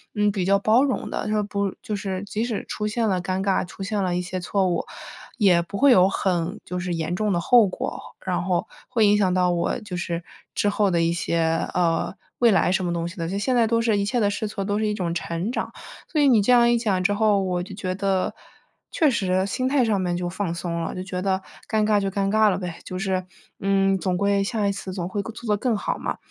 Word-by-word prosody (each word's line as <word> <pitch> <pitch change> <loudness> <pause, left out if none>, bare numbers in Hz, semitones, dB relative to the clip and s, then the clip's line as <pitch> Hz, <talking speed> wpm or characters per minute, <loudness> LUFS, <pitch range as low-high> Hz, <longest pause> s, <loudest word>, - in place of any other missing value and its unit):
嗯， 210 0 +2
比 195 -2 -2
较 195 +2 +4
包 220 +6 +4
容 270 -3 -1
的， - - -3
它 210 0 +1
不 200 -1 -2
就 215 - -3
是 190 -1 -3
即 210 +2 -3
使 235 -4 -3
出 210 - -3
现 225 +1 0
了 185 -3 +1
尴 185 +1 -2
尬、 195 -1 +1
出 190 +2 -8
现 205 +1 -1
了 180 -1 0
一 180 - 0
些 185 +1 -4
错 190 +2 0
误， 175 -2 0 0.5
也 185 -6 +4
不 200 +4 -6
会 280 +3 +6
有 190 -5 +6
很 185 +1 -1
就 180 - -4
是 180 -1 -2
严 165 +1 -2
重 210 +2 0
的 175 - +1
后 230 +4 +5
果， 185 - -4 0.2
然 180 -2 -1
后 180 -1 0 0.2
会 230 -3 +3
影 205 0 +5
响 190 -3 +3
到 180 -1 +3
我 170 -1 -1
就 200 -4 -6
是 170 -1 -3 0.3
之 - - +1
后 205 0 +2
的 170 -2 +2
一 165 0 +2
些， 170 -1 -1 0.4
呃， 170 0 +1 0.2
未 240 -1 +5
来 190 -2 +3
什 190 - +1
么 175 - -1
东 170 0 -2
西 170 - -9
的。 165 -1 -3
就 195 - -2
现 250 +5 0
在 235 -2 +4
都 230 +1 +2
是 225 -3 +2
一 200 - 0
切 240 +4 0
的 205 -3 +3
试 210 +1 -2
错 200 -2 -4
都 205 +1 0
是 215 - +1
一 210 - 0
种 175 -4 -2
成 170 +4 -3
长。 - - -3 0.4
所 310 - +1
以 285 - +5
你 235 -5 +5
这 205 - +2
样 240 -1 +6
一 240 - +3
讲 195 -5 0
之 200 +2 +2
后， 205 -1 +3
我 180 -1 -1
就 195 +1 -9
觉 185 -2 -3
得， 195 -1 0 0.6
确 310 -3 +3
实 190 -4 +1
心 255 +6 -1
态 270 -2 +3
上 210 -3 +1
面 175 -1 -1
就 175 0 -2
放 185 -1 -3
松 170 -1 -3
了， - - -4
就 185 - -4
觉 180 -1 -4
得 190 -1 0 0.3
尴 215 -1 +2
尬 210 -1 +3
就 195 -1 -1
尴 195 0 0
尬 215 0 +5
了 185 - 0
呗， 175 -2 -6
就 185 - -5
是， 190 -1 -1 0.3
嗯， 195 0 +2
总 180 -1 -1
归 200 +1 +2
下 210 0 -1
一 200 - +2
次 195 -1 -6
总 175 -2 -3
会 200 +1 -2
做 230 +3 -8
得 210 - +2
更 245 -2 +1
好 - - -2
嘛。 - - -3
195 Hz, 280 characters per minute, -24 LUFS, 180-210 Hz, 0.6 s, 会